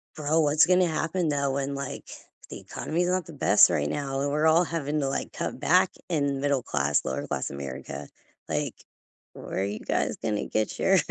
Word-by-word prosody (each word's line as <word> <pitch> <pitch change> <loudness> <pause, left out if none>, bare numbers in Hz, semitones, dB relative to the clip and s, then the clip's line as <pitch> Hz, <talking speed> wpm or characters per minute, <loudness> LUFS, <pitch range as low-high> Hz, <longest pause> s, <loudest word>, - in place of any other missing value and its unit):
Bro, 155 +2 +1
what's 150 0 +5
gonna 180 0 +4
happen 165 +1 -1
though 140 -2 0
when, 140 0 -2
like 140 -1 -6 0.4
The - - -7
economy's 175 +3 -2
not 180 -1 0
the 165 - -11
best 145 - +6
right 75 0 0
now 135 -2 -2
and 140 0 0
we're 150 +2 +2
all 165 +2 +5
having 155 -3 -2
to, 135 - 0
like, 135 - -3
cut - - -4
back - - +4 0.2
in 140 -4 0
middle-class, 75 - +1
lower-class 65 - -3
America, 70 +1 -6 0.4
like, - - -1 0.6
"Where - - -5
are 95 - +1
you 100 +2 -3
guys - - -1
gonna 105 -2 -2
get 110 0 -1
your 195 0 +4
140 Hz, 185 wpm, -27 LUFS, 115-160 Hz, 0.6 s, best